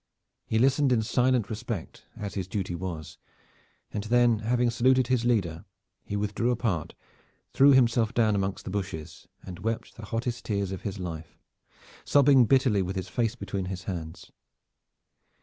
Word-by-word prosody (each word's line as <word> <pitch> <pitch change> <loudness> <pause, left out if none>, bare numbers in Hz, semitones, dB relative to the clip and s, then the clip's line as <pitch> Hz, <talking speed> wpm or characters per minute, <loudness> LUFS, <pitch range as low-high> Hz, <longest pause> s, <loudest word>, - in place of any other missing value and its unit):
He 110 - 0
listened 135 +3 +3
in 115 -3 +3
silent 125 -1 +2
respect, 110 -4 -6
as 100 -2 -5
his 95 -3 -3
duty 95 -2 -3
was, 85 -3 -6 0.7
and 105 - -4
then 120 -1 +3
having 120 +2 +1
saluted 130 +2 +3
his 125 -2 +1
leader 95 -9 0 0.4
he 100 - -5
withdrew 105 +3 -1
apart, 110 -10 -1 0.6
threw 140 +1 +6
himself 120 -3 +3
down 115 -3 +2
amongst 100 -1 -2
the - - -5
bushes, 95 -6 -5 0.2
and 90 -2 -8
wept 115 +1 -3
the 110 - -8
hottest 115 +2 -3
tears 100 -3 -1
of 95 - -5
his 100 -1 -4
life, 80 -4 -7 0.7
sobbing 140 -3 +5
bitterly 130 -5 +3
with 95 +1 -3
his 95 -1 -4
face 115 +3 -1
between 100 -6 -4
his 95 0 -5
hands. 80 -4 -6
110 Hz, 155 wpm, -27 LUFS, 95-120 Hz, 0.7 s, threw